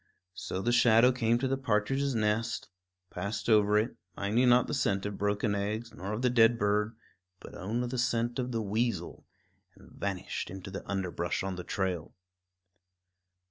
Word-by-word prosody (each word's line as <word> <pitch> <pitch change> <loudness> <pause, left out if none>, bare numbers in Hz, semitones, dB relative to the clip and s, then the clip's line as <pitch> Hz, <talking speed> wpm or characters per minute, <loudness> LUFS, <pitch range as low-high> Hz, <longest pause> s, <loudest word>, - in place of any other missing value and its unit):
So 95 0 -4
the 120 - +2
shadow 120 0 +6
came 120 -2 +2
to 130 +2 -1
the 135 0 -1
partridge's 135 +4 0
nest, 110 +1 0 0.4
passed 100 +5 -4
over 105 -2 +5
it, 110 +4 0 0.2
minding 115 +6 +2
not 125 +1 +5
the - - -4
scent 100 -7 0
of 105 -1 -4
broken 105 +1 0
eggs 105 +3 -3
nor 95 +3 -6
of 110 +4 -3
the 125 - +4
dead 115 -1 +5
bird, 105 +1 +1 0.4
but - - -12
only 115 +6 -2
the 125 +1 -3
scent 120 0 0
of 125 0 -2
the 115 -2 -1
weasel, 110 +4 -2 0.5
and - - -18
vanished 95 -3 -4
into 95 +1 -8
the 100 - -6
underbrush 90 -3 -2
on 95 -1 -3
the 90 - -6
trail. 90 -5 -3
110 Hz, 170 wpm, -30 LUFS, 100-120 Hz, 0.5 s, shadow